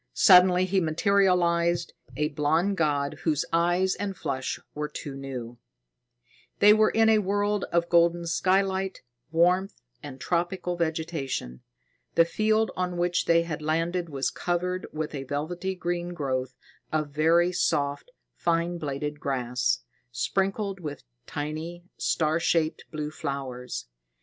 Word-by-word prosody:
Suddenly 180 -1 +7
he 190 0 +1
materialized, 170 -1 +2 0.2
a 150 0 +1
blond 160 +7 +1
god, 145 -4 0
whose 155 -4 +1
eyes 175 +3 +2
and 195 -2 -4
flesh 130 -1 -3
were 150 0 -3
too 145 -1 -7
new. 125 -3 -7 1.0
They 210 +1 +7
were 215 0 +4
in 225 0 +3
a 220 -1 +5
world 205 +1 0
of 170 0 0
golden 170 0 +3
skylight, 190 +3 0 0.3
warmth 180 +4 +2 0.2
and 135 -3 -9
tropical 175 +3 -1
vegetation. 160 - -3 0.5
The 165 - +6
field 215 +5 +1
on 180 -1 -2
which 175 0 +1
they 170 0 +4
had 160 -3 -5
landed 165 +3 -1
was 135 -3 -1
covered 180 +1 -2
with 155 0 -4
a 140 - -4
velvety 175 +7 -3
green 175 0 -3
growth 130 -4 -2 0.4
of 155 -2 -1
very 165 +4 +3
soft, 150 - 0 0.2
fine 170 +1 0
bladed 150 0 -4
grass, 125 -2 -1 0.3
sprinkled 195 - -1
with 150 -5 -6 0.2
tiny, 155 +4 -5
star 160 0 +1
shaped 165 -1 0
blue 150 -1 -4
flowers. 135 -4 -5
170 Hz, 130 wpm, -27 LUFS, 150-180 Hz, 1.0 s, Suddenly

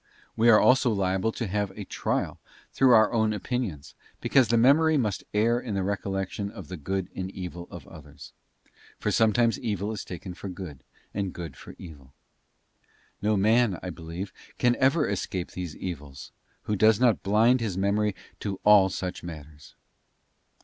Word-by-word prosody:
We 115 +2 +4
are 110 - +8
also 130 -1 +4
liable 95 0 0
to 120 - -3
many 100 0 -3
a - - -6
trial - - -2 0.3
through 130 -1 +4
our 110 0 +4
own 110 -2 +2
opinions, 105 - -4 0.3
because 130 -4 +3
the 115 - +2
memory 150 +6 +5
must 105 -7 -1
err 115 +3 +2
in 115 -5 -5
the 95 - 0
recollection 100 0 -3
of 100 -6 -10
the 95 - -5
good 95 +4 -3
and 95 0 -4
evil 90 -2 -7
of - - -10
others; 75 -2 -13 0.7
for - - -1
sometimes 115 +1 +3
evil 105 -3 -2
is 110 - -5
taken 90 +1 -7
for 95 - -8
good, 90 -7 -8 0.3
and 100 -2 -3
good 85 -6 -7
for - - -12
evil. 70 -7 -13 1.1
No 105 +1 +2
man, 110 +1 +3
as - - -9
I 90 - -4
believe, 85 +3 -7 0.2
can 120 -1 +3
ever 140 +4 +3
escape 95 -2 -3
these 90 -4 -6
evils, 75 -7 -7 0.3
who 105 - -1
does 110 +1 +4
not 120 -4 +3
blind 115 +5 +3
his 100 -5 -2
memory 100 +1 +1
as - - -21
to 100 -2 -4
all 105 -2 +6
such 90 -1 -4
matters. 75 -3 -11
100 Hz, 170 wpm, -27 LUFS, 90-110 Hz, 1.1 s, are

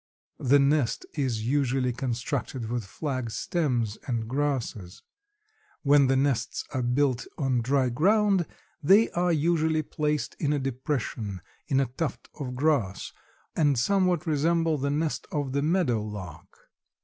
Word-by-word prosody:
The 135 +2 +4
nest 140 -3 +2
is 125 -7 -1
usually 130 -1 +1
constructed 125 -1 -3
with 120 -2 -1
flag 130 +2 -3
stems 120 - -1
and 115 -3 -2
grasses. 130 -9 -2 0.8
When 140 -1 +5
the 135 - +3
nests 135 -2 0
are 130 - 0
built 125 0 +1
on 130 -4 +1
dry 130 +1 +2
ground 195 - +3 0.3
they 195 +9 +5
are 175 0 +1
usually 160 0 +2
placed 150 -4 -2
in 150 -1 +1
a 145 - 0
depression 125 - -3 0.3
in 135 - +2
a 135 - +3
tuft 135 +3 -4
of 125 -3 -4
grass 130 -9 0 0.4
and 145 -4 +3
somewhat 180 +4 +2
resemble 165 0 +1
the 140 +2 0
nest 150 +2 -1
of 145 -3 -2
the 140 +1 0
meadow 155 - +1
lark. 95 -7 -8
140 Hz, 135 wpm, -27 LUFS, 120-155 Hz, 0.8 s, When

